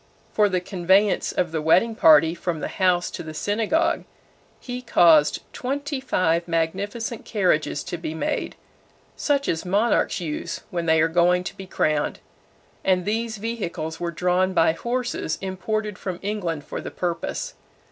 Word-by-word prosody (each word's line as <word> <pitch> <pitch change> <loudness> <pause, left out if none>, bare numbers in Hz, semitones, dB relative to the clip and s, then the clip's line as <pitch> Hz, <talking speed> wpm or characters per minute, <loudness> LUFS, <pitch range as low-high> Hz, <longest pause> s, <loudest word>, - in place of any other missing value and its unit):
For 210 -1 +4
the 185 -2 0
conveyance 190 +2 +2
of 175 -3 -1
the 160 -1 -2
wedding 195 +9 +4
party 160 -5 +6
from 170 -1 -3
the - - -3
house 180 -2 +1
to - - -6
the 155 -1 -8
synagogue, 230 - 0 0.6
he 250 0 -6
caused 165 -10 +4
twenty 280 +2 -3
five 175 -10 +1
magnificent 195 +8 -2
carriages 175 -8 0
to 175 -2 -5
be 160 -1 -5
made, 160 - -2 0.6
such 280 -1 0
as 160 - -1
monarchs 205 +6 +1
use 155 -4 -4
when 170 -2 -2
they 160 0 +4
are 160 - +4
going 175 +2 +3
to - - -6
be 190 - -9
crowned, 155 -4 0 0.7
and 185 -2 +2
these 225 +1 -1
vehicles 195 -8 -4
were 175 - -2
drawn 180 +3 +1
by 165 - +5
horses 240 -2 -2
imported 205 +2 -3
from 185 -3 -4
England 180 -7 -2
for - - -5
the - - -6
purpose. 175 -2 -3
180 Hz, 155 wpm, -24 LUFS, 165-215 Hz, 0.7 s, party